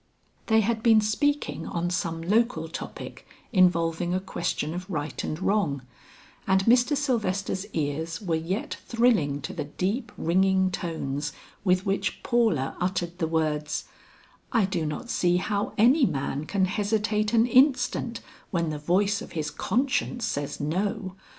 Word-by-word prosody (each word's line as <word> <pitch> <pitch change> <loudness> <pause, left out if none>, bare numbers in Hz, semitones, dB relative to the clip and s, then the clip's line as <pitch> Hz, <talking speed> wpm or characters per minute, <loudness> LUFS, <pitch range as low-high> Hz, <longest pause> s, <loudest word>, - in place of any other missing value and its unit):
They 220 -1 +5
had 220 +1 0
been 225 -1 +6
speaking 220 - 0
on 175 +1 -2
some 165 -2 -2
local 230 +7 +1
topic - - -8 0.3
involving 175 -2 +3
a - - +1
question 170 -4 -3
of 180 +2 -6
right 150 -5 -3
and 155 - -3
wrong, 175 -9 0 0.6
and 190 0 +3
Mr. 245 +4 +4
Sylvester's 205 -8 -1
ears 160 +1 -2
were 185 -6 -2
yet 165 +6 -2
thrilling 215 - +2
to - - -5
the - - -4
deep 205 - -2
ringing 190 +2 +2
tones 150 -5 -3 0.3
with 185 -1 +2
which 195 0 -1
Paula 220 - +1
uttered 175 -1 -2
the 165 - +1
words, 155 -2 -1 0.7
"I 225 -5 +3
do 175 -5 -2
not 150 +10 -5
see 175 0 +2
how 205 +2 -1
any 250 +5 +5
man 140 +1 -2
can 190 +2 +1
hesitate 210 +2 0
an 225 0 +5
instant 255 -2 +3 0.3
when 170 -4 0
the 150 - -4
voice 195 +6 +1
of - - -9
his 155 -3 -2
conscience 245 - 0
says 145 -9 -3
no. 190 +6 -2
185 Hz, 145 wpm, -26 LUFS, 165-220 Hz, 0.7 s, been